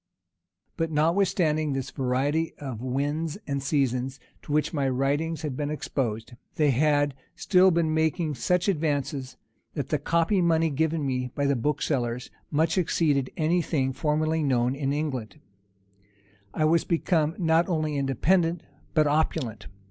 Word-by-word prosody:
But, 165 -2 0
notwithstanding 160 -1 +1
this 135 0 -3
variety 140 +5 0
of 130 -6 -6
winds 145 +6 -2
and 140 -1 -2
seasons, 135 -2 0 0.2
to - - -9
which 150 +3 +1
my 140 -3 +1
writings 145 +5 -1
had 145 -4 -3
been 145 +1 -2
exposed, 120 -6 -3 0.2
they 150 -2 +3
had 145 +1 +2 0.2
still 185 0 +4
been 165 -3 +1
making 160 0 0
such 180 +6 0
advances, 145 -6 -1 0.4
that - - -3
the - - +1
copy 170 +4 +1
money 165 -2 +2
given 160 +1 0
me 125 -1 -1
by 140 - 0
the 140 0 +2
booksellers 125 -2 -1 0.2
much 160 +4 +1
exceeded 150 -6 +1
any 170 +2 +2
thing 135 -5 -1
formerly 155 +3 0
known 125 -3 +1
in 140 0 -2
England; 135 -9 -3 1.1
I 155 - 0
was 165 +1 +3
become 165 -1 +1
not 165 0 +2
only 155 -3 0
independent, 165 +6 +1 0.3
but 155 -1 +4
opulent. 145 - -1
150 Hz, 140 wpm, -26 LUFS, 135-160 Hz, 1.1 s, still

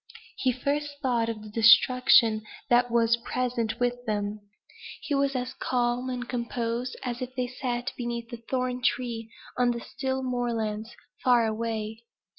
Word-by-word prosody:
He 260 - +2
first 285 +3 -2
thought 235 -3 +1
of 215 -2 -5
the 215 - -9
destruction 230 0 +6 0.3
that 245 0 +5
was 235 0 +3
present 235 -1 -2
with 245 0 0
them. 205 0 -1 0.6
He 295 - -2
was 275 0 +1
as 250 0 -2
calm 245 0 0
and 245 -1 -4
composed 235 0 -2
as 245 -1 -3
if 255 +1 -5
they 250 -1 0
sat 245 -1 -3
beneath 235 -1 -4
the 240 - -6
thorn 255 -1 -1
tree 240 -2 -1 0.3
on 245 -1 +4
the 235 -1 -1
still 265 +2 -3
moorlands, 230 -3 -2 0.3
far 245 -2 +5
away. 220 0 -3
240 Hz, 150 wpm, -27 LUFS, 230-255 Hz, 0.6 s, destruction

